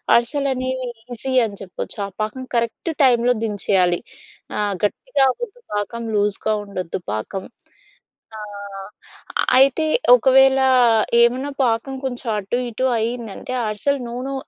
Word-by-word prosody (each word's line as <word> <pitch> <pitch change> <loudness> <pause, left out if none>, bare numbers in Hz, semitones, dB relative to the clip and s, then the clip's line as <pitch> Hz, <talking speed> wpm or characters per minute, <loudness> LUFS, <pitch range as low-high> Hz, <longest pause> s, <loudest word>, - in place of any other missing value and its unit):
అరిసెలు 275 +4 +1
అనేవి 255 0 -3 0.3
ఈజీ 260 +3 -4
అని 205 -2 -7
చెప్పొచ్చు. 190 -2 -6
ఆ - - -9
పాకం 215 +5 -3
కరెక్ట్ 235 +8 -1
టైంలో 245 -1 +4
దించేయాలి. 190 -4 +1 0.6
ఆ - - -1 0.2
గట్టిగా 275 - +1
అవ్వద్దు 480 - -8
పాకం 220 +3 -3
లూజ్‌గా 205 +1 +1
ఉండొద్దు 185 -3 -4
పాకం. 110 - -4 0.9
ఆ! - - -7 1.2
అయితే 275 +4 +4 0.3
ఒకవేళ 265 +1 +5 0.6
ఏమైనా 255 +4 +2
పాకం 235 +3 0
కొంచెం 245 -1 -4
అటు 210 +4 -2
ఇటు 245 +3 -1
అయిందంటే, 230 +1 -4
అరిసెలు 265 +7 -1
నూనో 250 +3 -4
240 Hz, 115 wpm, -21 LUFS, 210-265 Hz, 1.2 s, ఒకవేళ